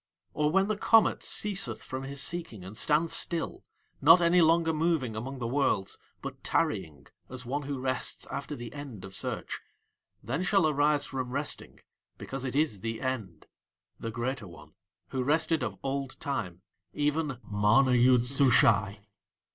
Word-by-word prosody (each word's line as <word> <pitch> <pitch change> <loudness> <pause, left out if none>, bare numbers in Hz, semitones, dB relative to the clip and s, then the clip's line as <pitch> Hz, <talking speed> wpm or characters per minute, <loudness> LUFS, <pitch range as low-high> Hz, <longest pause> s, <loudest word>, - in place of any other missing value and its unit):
Or 150 0 +1
when 195 +4 +2
the 215 - 0
comet 225 +1 +4
ceaseth 200 -2 0
from 130 0 -5
his 140 +1 -1
seeking 165 - -2
and 95 +3 -9
stands 155 +7 +2
still, 170 -2 0 0.4
not 165 +5 +8
any 175 +1 +4
longer 165 0 +3
moving 155 -7 0
among 130 +5 -5
the 120 - -4
Worlds 115 -6 0 0.2
but - - -7
tarrying 75 -2 -1 0.2
as 130 -1 -7
one 140 +4 -2
who 140 -1 -4
rests 130 0 -1
after - - -4
the 120 -1 -8
end 135 -10 -8
of 95 - -10
search, - - -3 0.6
then 130 - -2
shall 185 -2 +3
arise 150 0 +2
from 130 -2 -4
resting, 140 +3 -3 0.4
because 135 0 -6
it 130 - -3
is 145 -9 +1
THE 115 +3 -4
END, 110 - -4 0.5
the 115 - -4
Greater 120 0 -3
One, 80 -3 -14 0.4
who 130 - -2
rested 160 +4 +2
of - - -3
old 135 0 -3
time, 95 -11 -4 0.3
even 150 -2 -1
MANA 105 +6 +3
YOOD 125 0 +5
SUSHAI. 115 -6 +3
135 Hz, 155 wpm, -29 LUFS, 115-155 Hz, 0.6 s, not